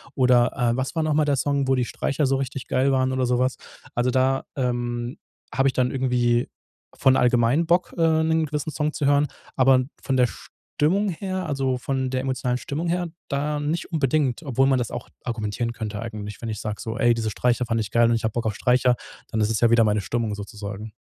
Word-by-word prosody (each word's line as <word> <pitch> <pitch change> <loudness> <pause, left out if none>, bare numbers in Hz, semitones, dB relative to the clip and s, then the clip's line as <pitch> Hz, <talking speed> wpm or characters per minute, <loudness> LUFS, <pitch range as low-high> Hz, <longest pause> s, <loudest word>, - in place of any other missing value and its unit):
Oder, 125 -2 +4
äh: 120 -3 +1
„Was 130 +1 -2
war 160 - +1
noch 155 -1 +1
mal 155 0 +3
der 145 -2 +1
Song, 140 0 0
wo 135 - +3
die 125 -1 0
Streicher 140 +4 -1
so 135 0 +2
richtig 135 -1 -4
geil 135 +2 +2
waren“ 130 -1 +1
oder 130 -1 +1
so 125 0 +1
was? 130 +1 +1 0.4
Also, 120 +1 +1
da, 130 +1 +2
ähm, 120 -1 -2 0.4
habe 135 +1 +3
ich - - -4
dann 125 -1 +1
irgendwie 125 -2 +1 0.5
von 130 0 +4
allgemein 125 +5 +3
Bock, 175 +2 +1
äh, 160 -1 +3
'nen 160 0 +2
gewissen 150 0 -3
Song 150 +2 -1
zu 145 - -2
hören, 145 +1 +4 0.3
aber 130 -1 +4 0.2
von 135 - 0
der 125 -1 +4
Stimmung 190 - -2
her, 185 +1 -3
also, 135 -3 0
von 130 0 -2
der 130 -1 0
emotionalen 130 -2 -1
Stimmung 160 +6 -3
her, 175 0 0 0.2
da 145 +2 -1
nicht 155 +3 -3
unbedingt, 145 -2 +1
obwohl 135 -2 +2
man 135 -1 +3
das 120 - -3
auch - - -6
argumentieren 115 0 -2
könnte 110 -2 -5
eigentlich. 105 -3 -6
Wenn 115 - -3
ich 110 -2 -4
sag 105 -1 -4
so: 115 -1 -5
„Ey, 120 0 +4
diese 110 -2 -2
Streicher 125 +4 +1
fand 115 -1 0
ich 105 - -4
geil 120 0 +4
und 115 - +3
ich 115 - -3
habe 110 -1 -1
Bock 120 - -2
auf 110 - 0
Streicher,“ 125 0 +3 0.4
dann 110 - 0
ist 105 - +2
es 115 - -1
ja 120 -1 +4
wieder 115 -1 +6
meine 105 -1 +2
Stimmung 110 +2 -2
sozusagen. 105 0 -7
130 Hz, 225 wpm, -24 LUFS, 120-140 Hz, 0.5 s, wieder